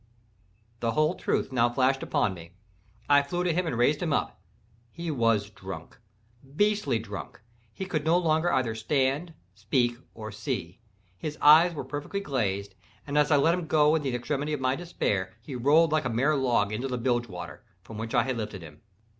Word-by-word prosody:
The 115 Hz, -1 st, -1 dB
whole 155 Hz, +2 st, +2 dB
truth 135 Hz, -, -1 dB
now 120 Hz, -2 st, +3 dB
flashed 130 Hz, +2 st, +1 dB
upon 100 Hz, -, 0 dB
me. 85 Hz, 0 st, -12 dB, 0.5 s
I 145 Hz, 0 st, +6 dB
flew 175 Hz, +6 st, -3 dB
to 175 Hz, -2 st, +1 dB
him 180 Hz, +1 st, 0 dB
and 125 Hz, -, -2 dB
raised 145 Hz, +5 st, +2 dB
him 170 Hz, -3 st, -1 dB
up. -, -, -1 dB, 0.5 s
He 170 Hz, +4 st, -5 dB
was 115 Hz, -6 st, +1 dB
drunk—beastly 115 Hz, -, -3 dB
drunk—he 115 Hz, -, -9 dB
could 155 Hz, -5 st, -2 dB
no 165 Hz, +3 st, +3 dB
longer 165 Hz, 0 st, +2 dB
either 120 Hz, -4 st, +1 dB
stand, 140 Hz, +7 st, -1 dB, 0.2 s
speak, 120 Hz, -3 st, 0 dB, 0.2 s
or 110 Hz, -1 st, -7 dB
see. 105 Hz, -, -4 dB, 0.4 s
His 150 Hz, +5 st, -5 dB
eyes 160 Hz, +3 st, +7 dB
were -, -, -4 dB
perfectly 145 Hz, +7 st, -4 dB
glazed; 100 Hz, -, -2 dB, 0.3 s
and 145 Hz, -, -5 dB
as 150 Hz, 0 st, +4 dB
I 150 Hz, -, +5 dB
let 160 Hz, +4 st, +4 dB
him 175 Hz, -2 st, -3 dB
go 150 Hz, -1 st, +4 dB
in 160 Hz, -, +2 dB
the 135 Hz, -4 st, -2 dB
extremity 145 Hz, +5 st, -2 dB
of 150 Hz, -, -2 dB
my 130 Hz, 0 st, +1 dB
despair, 105 Hz, -, -2 dB
he 130 Hz, +4 st, -9 dB
rolled 145 Hz, +6 st, +4 dB
like 155 Hz, -3 st, +1 dB
a -, -, 0 dB
mere 135 Hz, +7 st, +2 dB
log 120 Hz, -7 st, +1 dB
into 120 Hz, +5 st, -2 dB
the 125 Hz, -1 st, -3 dB
bilge 120 Hz, -1 st, 0 dB
water, 90 Hz, -1 st, -8 dB, 0.2 s
from 105 Hz, +2 st, -9 dB
which 115 Hz, +3 st, -4 dB
I 120 Hz, -, +4 dB
had 130 Hz, -1 st, -2 dB
lifted 105 Hz, -5 st, -5 dB
him. 75 Hz, -1 st, -13 dB
130 Hz, 190 wpm, -27 LUFS, 115-155 Hz, 0.5 s, eyes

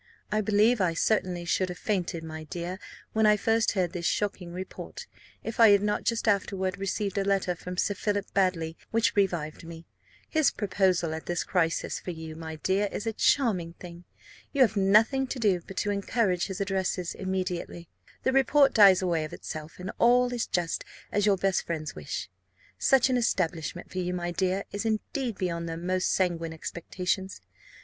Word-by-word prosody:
I 215 Hz, +1 st, +2 dB
believe 215 Hz, +2 st, +3 dB
I 170 Hz, -3 st, +1 dB
certainly 180 Hz, -3 st, 0 dB
should 185 Hz, +3 st, +1 dB
have 180 Hz, -, -6 dB
fainted, 180 Hz, -5 st, -2 dB
my 160 Hz, -1 st, -7 dB
dear, 175 Hz, +4 st, -5 dB, 0.3 s
when 220 Hz, 0 st, +4 dB
I 210 Hz, 0 st, +5 dB
first 225 Hz, +1 st, +2 dB
heard 180 Hz, -4 st, 0 dB
this 170 Hz, -1 st, -2 dB
shocking 190 Hz, -4 st, -2 dB
report, 185 Hz, +2 st, -7 dB, 0.4 s
if 225 Hz, -, -5 dB
I 225 Hz, -2 st, +9 dB
had 200 Hz, 0 st, +5 dB
not 210 Hz, 0 st, -1 dB
just 230 Hz, 0 st, 0 dB
afterward 195 Hz, -2 st, 0 dB
received 195 Hz, 0 st, -1 dB
a -, -, +1 dB
letter 195 Hz, -2 st, +1 dB
from 180 Hz, +1 st, -8 dB
Sir 205 Hz, -, +1 dB
Philip 205 Hz, 0 st, -1 dB
Baddely 175 Hz, -4 st, +1 dB
which 230 Hz, 0 st, +1 dB
revived 175 Hz, -7 st, 0 dB
me. 165 Hz, 0 st, -10 dB, 0.4 s
His 315 Hz, -2 st, +3 dB
proposal 185 Hz, -5 st, +1 dB
at 160 Hz, -, -7 dB
this 175 Hz, 0 st, -1 dB
crisis 165 Hz, -3 st, 0 dB
for -, -, -8 dB
you, 160 Hz, -2 st, -6 dB
my 160 Hz, 0 st, -6 dB
dear, 195 Hz, +5 st, 0 dB
is 205 Hz, -, -4 dB
a 225 Hz, -, -1 dB
charming 205 Hz, -10 st, +2 dB
thing. 175 Hz, 0 st, -11 dB, 0.5 s
You 280 Hz, -, +1 dB
have 225 Hz, -3 st, +1 dB
nothing 215 Hz, +7 st, +4 dB
to 260 Hz, -, -4 dB
do 200 Hz, -7 st, +2 dB
but 195 Hz, -, -9 dB
to 205 Hz, -, 0 dB
encourage 200 Hz, -2 st, 0 dB
his 190 Hz, -2 st, -5 dB
addresses 190 Hz, -3 st, -1 dB
immediately, 180 Hz, -2 st, -3 dB, 0.4 s
the 260 Hz, -, +2 dB
report 270 Hz, +1 st, +4 dB
dies 195 Hz, -4 st, +7 dB
away 170 Hz, -3 st, +1 dB
of 155 Hz, -, -7 dB
itself, 155 Hz, 0 st, -7 dB
and 180 Hz, +1 st, -5 dB
all 245 Hz, +1 st, +4 dB
is 240 Hz, -2 st, -1 dB
just 175 Hz, -2 st, -1 dB, 0.3 s
as 205 Hz, 0 st, +2 dB
your 200 Hz, -2 st, +4 dB
best 195 Hz, 0 st, +1 dB
friends 155 Hz, -2 st, -3 dB
wish. -, -, -5 dB, 0.5 s
Such 265 Hz, -1 st, +4 dB
an 250 Hz, -, +3 dB
establishment 175 Hz, -7 st, -1 dB
for 185 Hz, -, -3 dB
you, 180 Hz, 0 st, -2 dB
my 175 Hz, 0 st, -2 dB
dear, 185 Hz, +2 st, 0 dB
is 205 Hz, +1 st, -3 dB
indeed 225 Hz, +2 st, -2 dB
beyond 170 Hz, -2 st, -2 dB
their 165 Hz, -, -4 dB
most 180 Hz, +2 st, 0 dB
sanguine 170 Hz, -3 st, 0 dB
expectations. 180 Hz, +4 st, -3 dB
190 Hz, 185 wpm, -28 LUFS, 175-210 Hz, 0.5 s, I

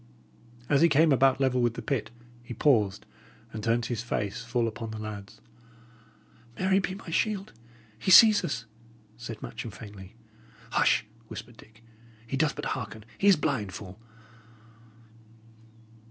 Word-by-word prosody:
As 140 Hz, 0 st, +3 dB
he 170 Hz, -, +6 dB
came 155 Hz, +2 st, +4 dB
about 135 Hz, 0 st, +4 dB
level 130 Hz, -2 st, +2 dB
with 120 Hz, -1 st, +1 dB
the -, -, -5 dB
pit, 135 Hz, -6 st, -2 dB, 0.3 s
he 120 Hz, 0 st, -8 dB
paused, 105 Hz, -7 st, +2 dB, 0.5 s
and 110 Hz, -1 st, -6 dB
turned 115 Hz, +1 st, +1 dB
his 120 Hz, -3 st, -3 dB
face 105 Hz, -3 st, -3 dB
full 120 Hz, 0 st, 0 dB
upon 115 Hz, 0 st, -5 dB
the 110 Hz, -, -6 dB
lads. 105 Hz, -2 st, -8 dB, 1.2 s
"Mary 190 Hz, +1 st, +2 dB
be 190 Hz, -1 st, -3 dB
my 190 Hz, -4 st, -9 dB
shield! 205 Hz, +2 st, -1 dB, 0.5 s
He 190 Hz, -, -2 dB
sees 215 Hz, +3 st, +8 dB
us!" 115 Hz, -5 st, -3 dB, 0.5 s
said 115 Hz, -1 st, -8 dB
Matcham, 115 Hz, -, -6 dB
faintly. 100 Hz, -2 st, -11 dB, 0.6 s
"Hush!" -, -, +3 dB, 0.2 s
whispered 120 Hz, 0 st, -9 dB
Dick. 110 Hz, 0 st, -18 dB, 0.4 s
"He 120 Hz, -, -4 dB
doth 150 Hz, +2 st, +1 dB
but -, -, -5 dB
hearken. 110 Hz, -3 st, -7 dB
He 200 Hz, -, +2 dB
is 200 Hz, -, +8 dB
blind, 125 Hz, -, -2 dB
fool!" 95 Hz, 0 st, -9 dB
120 Hz, 145 wpm, -28 LUFS, 110-145 Hz, 1.2 s, sees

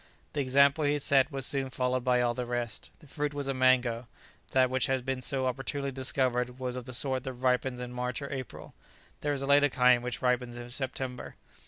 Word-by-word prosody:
The 145 Hz, -, 0 dB
example 140 Hz, +3 st, +4 dB
he 145 Hz, 0 st, +2 dB
set 140 Hz, 0 st, +3 dB
was 135 Hz, -2 st, -2 dB
soon 135 Hz, -1 st, +1 dB
followed 125 Hz, 0 st, -1 dB
by 125 Hz, -1 st, +3 dB
all 120 Hz, -1 st, +1 dB
the 125 Hz, 0 st, -4 dB
rest. 120 Hz, -1 st, -4 dB
The 150 Hz, -, -16 dB
fruit 145 Hz, +1 st, -3 dB
was 140 Hz, -1 st, -3 dB
a 135 Hz, -, 0 dB
mango; 130 Hz, -2 st, +2 dB, 0.4 s
that 130 Hz, -1 st, +3 dB
which 130 Hz, +1 st, +1 dB
had 130 Hz, -2 st, -1 dB
been 135 Hz, -1 st, -2 dB
so 130 Hz, +1 st, 0 dB
opportunely 135 Hz, +2 st, -2 dB
discovered 125 Hz, -2 st, 0 dB
was 125 Hz, -1 st, -3 dB
of 125 Hz, -2 st, -6 dB
the 130 Hz, -, -7 dB
sort 130 Hz, 0 st, 0 dB
that 130 Hz, -, -4 dB
ripens 125 Hz, 0 st, 0 dB
in 125 Hz, 0 st, -6 dB
March 125 Hz, 0 st, -2 dB
or 140 Hz, 0 st, -6 dB
April; 130 Hz, -3 st, -7 dB, 0.5 s
there 145 Hz, -, -1 dB
is 140 Hz, -1 st, -2 dB
a -, -, -1 dB
later 145 Hz, +1 st, +5 dB
kind 125 Hz, -1 st, +4 dB
which 125 Hz, 0 st, -4 dB
ripens 125 Hz, -1 st, 0 dB
in 120 Hz, 0 st, -8 dB
September. 130 Hz, -1 st, -5 dB
130 Hz, 215 wpm, -29 LUFS, 125-135 Hz, 0.5 s, later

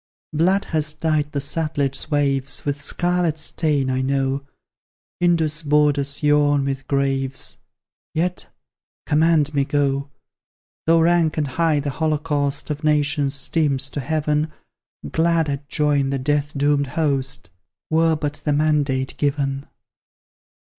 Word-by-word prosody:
Blood 185 Hz, +6 st, +2 dB
has 155 Hz, -1 st, 0 dB
dyed 155 Hz, -1 st, 0 dB
the 145 Hz, -, -4 dB
Sutlej's 145 Hz, -1 st, -1 dB
waves 140 Hz, -3 st, 0 dB
With 145 Hz, 0 st, -2 dB
scarlet 175 Hz, 0 st, 0 dB
stain, 150 Hz, -4 st, 0 dB
I 130 Hz, 0 st, 0 dB
know; 135 Hz, +1 st, -1 dB, 0.7 s
Indus' 165 Hz, -3 st, +2 dB
borders 145 Hz, -1 st, +1 dB
yawn 145 Hz, -1 st, +3 dB
with 135 Hz, -1 st, -4 dB
graves, 135 Hz, -1 st, -1 dB, 0.6 s
Yet, 180 Hz, +3 st, -1 dB, 0.6 s
command 155 Hz, -1 st, +3 dB
me 140 Hz, -1 st, +2 dB
go! 140 Hz, -1 st, 0 dB, 0.8 s
Though 165 Hz, 0 st, +5 dB
rank 165 Hz, -1 st, +2 dB
and 150 Hz, -, +1 dB
high 155 Hz, +2 st, +1 dB
the 145 Hz, 0 st, -3 dB
holocaust 150 Hz, -1 st, -1 dB
Of 150 Hz, +1 st, -5 dB
nations 150 Hz, -2 st, +1 dB
steams 140 Hz, -1 st, 0 dB
to -, -, -4 dB
heaven, 150 Hz, +2 st, -1 dB, 0.6 s
Glad 165 Hz, -1 st, +2 dB
I'd 140 Hz, 0 st, -4 dB
join 145 Hz, -2 st, +1 dB
the 135 Hz, -, -1 dB
death 145 Hz, +2 st, -1 dB
doomed 145 Hz, 0 st, +2 dB
host, 135 Hz, -, -2 dB, 0.4 s
Were 160 Hz, 0 st, +3 dB
but 145 Hz, -1 st, -4 dB
the 150 Hz, -, +1 dB
mandate 145 Hz, -3 st, +1 dB
given. 140 Hz, -1 st, -1 dB
145 Hz, 125 wpm, -21 LUFS, 140-155 Hz, 0.8 s, Though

